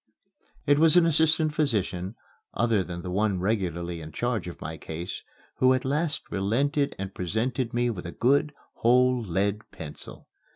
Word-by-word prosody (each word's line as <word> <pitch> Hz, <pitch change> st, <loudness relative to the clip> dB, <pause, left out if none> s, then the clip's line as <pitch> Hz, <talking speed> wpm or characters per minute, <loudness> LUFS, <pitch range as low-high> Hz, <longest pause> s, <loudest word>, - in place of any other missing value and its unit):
It 145 Hz, 0 st, +4 dB
was 165 Hz, +2 st, +6 dB
an 175 Hz, -, +6 dB
assistant 160 Hz, -1 st, +3 dB
physician, 105 Hz, -, +1 dB, 0.4 s
other 115 Hz, -4 st, +2 dB
than 85 Hz, -1 st, -7 dB
the 90 Hz, -, -5 dB
one 100 Hz, 0 st, +1 dB
regularly 90 Hz, -4 st, -2 dB
in 80 Hz, 0 st, -9 dB
charge 115 Hz, +1 st, -2 dB
of 90 Hz, -, -8 dB
my 80 Hz, -, -5 dB
case, 85 Hz, +3 st, -6 dB, 0.4 s
who 130 Hz, 0 st, +5 dB
at 130 Hz, -, -3 dB
last 150 Hz, +3 st, -1 dB
relented 140 Hz, +9 st, 0 dB
and 95 Hz, 0 st, -5 dB
presented 115 Hz, +7 st, -2 dB
me 120 Hz, 0 st, +1 dB
with 90 Hz, -5 st, -6 dB
a -, -, -5 dB
good, 140 Hz, -, +2 dB, 0.3 s
whole 125 Hz, +1 st, +3 dB
lead 100 Hz, +2 st, 0 dB
pencil. 75 Hz, -2 st, -10 dB
110 Hz, 160 wpm, -26 LUFS, 90-135 Hz, 0.4 s, was